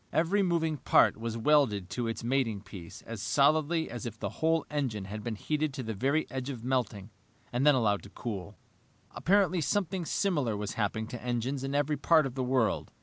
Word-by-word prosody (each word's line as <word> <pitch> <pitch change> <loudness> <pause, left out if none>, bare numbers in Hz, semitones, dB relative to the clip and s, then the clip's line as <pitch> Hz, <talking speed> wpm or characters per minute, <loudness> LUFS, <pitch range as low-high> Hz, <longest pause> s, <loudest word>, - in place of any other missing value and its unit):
Every 175 +6 +2
moving 165 -4 +1
part - - +4
was 115 +1 -4
welded 115 -8 +2
to 120 -2 -2
its 115 +1 -4
mating 120 -5 0
piece 95 -4 -10
as 115 -3 -7
solidly 155 +6 +2
as 120 -1 -5
if 115 -1 -7
the - - -3
whole 160 -1 +2
engine 125 -9 -2
had 105 +2 -6
been 115 -1 -3
heated 150 +5 -1
to 130 - -4
the 110 -1 -3
very 140 +9 +1
edge 130 0 -4
of 120 -5 -6
melting 115 -5 -1 0.4
and 130 +4 +2
then 145 - +7
allowed 105 -5 +2
to - - -12
cool. 105 -4 -6 0.5
Apparently 185 -2 +2
something 185 +1 -1
similar 145 - 0
was 105 0 -4
happening 110 +1 -1
to 120 - -6
engines 125 +2 -2
in 135 +1 -2
every 145 +1 +1
part 155 +2 +4
of 135 - -4
the 130 0 -2
world. 125 -3 +1
130 Hz, 200 wpm, -30 LUFS, 110-150 Hz, 0.5 s, then